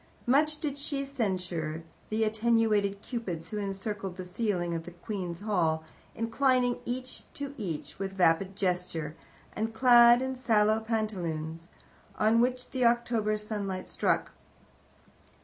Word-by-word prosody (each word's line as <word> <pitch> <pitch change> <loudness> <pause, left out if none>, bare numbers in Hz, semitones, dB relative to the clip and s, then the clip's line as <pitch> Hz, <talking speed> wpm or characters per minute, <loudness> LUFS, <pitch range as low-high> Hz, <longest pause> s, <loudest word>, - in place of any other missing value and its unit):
Much 300 +4 +3
did 285 -2 -3
she 280 -1 -2
censure 180 - -2 0.3
the 220 +1 +1
attenuated 215 -2 +2
Cupids 180 -10 -4
who 210 - -2
encircle 195 0 -3
the 185 0 -8
ceiling 180 -3 -1
of 165 -1 -3
the - - -7
Queen's 175 -1 -5
Hall, 165 -7 +1 0.3
inclining 245 +2 +2
each 255 +1 -4
to 280 0 -4
each 180 - -5
with 195 0 -3
vapid 185 +1 +2
gesture, 180 -5 -2 0.4
and 225 +1 -2
clad 240 -1 +7
in 260 0 -2
sallow 215 -3 +3
pantaloons, 175 -8 -3 0.5
on 220 +2 +4
which 250 0 0
the 260 -1 0
October 235 -3 +2
sunlight 205 -3 -4
struck. - - 0
215 Hz, 130 wpm, -29 LUFS, 180-240 Hz, 0.5 s, clad